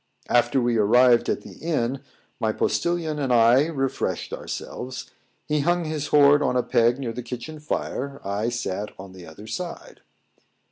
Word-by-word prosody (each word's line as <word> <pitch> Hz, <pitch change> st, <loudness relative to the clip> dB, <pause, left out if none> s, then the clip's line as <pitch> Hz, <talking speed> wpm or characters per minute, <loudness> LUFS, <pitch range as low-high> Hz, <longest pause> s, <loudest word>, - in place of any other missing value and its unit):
After 120 Hz, +2 st, +3 dB
we 120 Hz, -1 st, +1 dB
arrived 120 Hz, +3 st, +5 dB
at -, -, 0 dB
the -, -, -13 dB
inn 135 Hz, -5 st, -1 dB, 0.4 s
my 110 Hz, -1 st, +1 dB
postillion 160 Hz, +4 st, -1 dB
and 135 Hz, -3 st, -1 dB
I 120 Hz, +5 st, +5 dB
refreshed 135 Hz, -5 st, -2 dB
ourselves: 130 Hz, +1 st, -6 dB, 0.3 s
he 150 Hz, -1 st, 0 dB
hung 175 Hz, +3 st, +1 dB
his 155 Hz, -2 st, -3 dB
horn 145 Hz, 0 st, +6 dB
on 125 Hz, -3 st, +1 dB
a 125 Hz, -, +2 dB
peg 120 Hz, +1 st, +3 dB
near 125 Hz, -4 st, -4 dB
the 125 Hz, -, -5 dB
kitchen 125 Hz, +6 st, -7 dB
fire; 140 Hz, -2 st, -3 dB
I 100 Hz, +4 st, -1 dB
sat 105 Hz, -3 st, -4 dB
on 95 Hz, 0 st, -10 dB
the 90 Hz, -2 st, -11 dB
other 80 Hz, +7 st, -12 dB
side. 170 Hz, +11 st, -7 dB
125 Hz, 160 wpm, -24 LUFS, 115-145 Hz, 0.4 s, horn